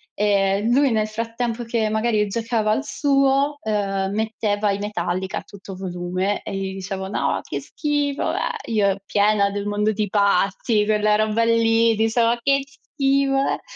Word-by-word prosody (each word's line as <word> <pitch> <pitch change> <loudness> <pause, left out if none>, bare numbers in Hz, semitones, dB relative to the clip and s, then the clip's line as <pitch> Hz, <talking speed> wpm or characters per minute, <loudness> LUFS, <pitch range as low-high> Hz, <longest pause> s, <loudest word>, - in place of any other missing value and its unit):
ehm, 200 +1 +1
lui 280 0 +4
nel 215 -1 +1
frattempo, 230 +2 -3
che 230 -2 -1
magari 220 -1 +1
giocava 225 0 -1
al 275 +6 0
suo, 280 0 +1
ehm, 195 -3 -1
metteva 215 -2 0
i 195 - -1
metallica 190 -2 -3
a - - -10
tutto 195 -1 -11
volume 185 +2 -3
e - - -5
gli 190 0 -3
dicevo: 190 0 -5
"No, 200 - -1
che - - -4
schifo, 290 -2 -2
bleah!" 480 - -1
Io 200 -3 +1
piena 205 0 +2
del 200 0 -4
mondo 210 +1 0
di 210 0 -1
Patty, 200 +1 +2
quella 210 0 +2
roba 215 +1 +1
lì, 230 0 +3
dicevo: 230 +2 +2
"Che 275 0 +3
schifo, 275 0 -1
bleah." 270 0 0
215 Hz, 155 wpm, -22 LUFS, 200-230 Hz, -, lui